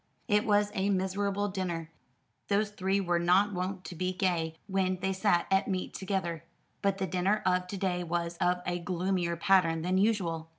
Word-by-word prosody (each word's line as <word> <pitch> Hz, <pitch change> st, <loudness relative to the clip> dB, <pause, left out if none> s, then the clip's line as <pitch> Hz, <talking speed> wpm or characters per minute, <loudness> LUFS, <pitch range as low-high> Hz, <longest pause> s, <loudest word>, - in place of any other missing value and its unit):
It 210 Hz, -1 st, +2 dB
was 205 Hz, -1 st, +3 dB
a 195 Hz, +1 st, 0 dB
miserable 200 Hz, +1 st, 0 dB
dinner. 175 Hz, -4 st, -3 dB, 0.6 s
Those 205 Hz, +1 st, +1 dB
three 195 Hz, -1 st, 0 dB
were 175 Hz, -3 st, +1 dB
not 185 Hz, +4 st, +3 dB
wont 185 Hz, 0 st, -3 dB
to -, -, -6 dB
be 185 Hz, +2 st, -1 dB
gay 175 Hz, -4 st, 0 dB
when 190 Hz, -1 st, 0 dB
they 190 Hz, +1 st, 0 dB
sat 190 Hz, -2 st, +2 dB
at 190 Hz, +1 st, +3 dB
meat 185 Hz, -2 st, -2 dB
together; 185 Hz, -4 st, -3 dB, 0.4 s
but 200 Hz, -1 st, +1 dB
the 190 Hz, -, -1 dB
dinner 185 Hz, +4 st, 0 dB
of 180 Hz, -1 st, +2 dB
to 195 Hz, -, -5 dB
day 180 Hz, -2 st, -1 dB
was 170 Hz, 0 st, -2 dB
of 180 Hz, +1 st, +1 dB
a 175 Hz, 0 st, -1 dB
gloomier 175 Hz, 0 st, -1 dB
pattern 165 Hz, -2 st, +3 dB
than 185 Hz, +2 st, +1 dB
usual. 175 Hz, -7 st, 0 dB
185 Hz, 180 wpm, -30 LUFS, 175-195 Hz, 0.6 s, was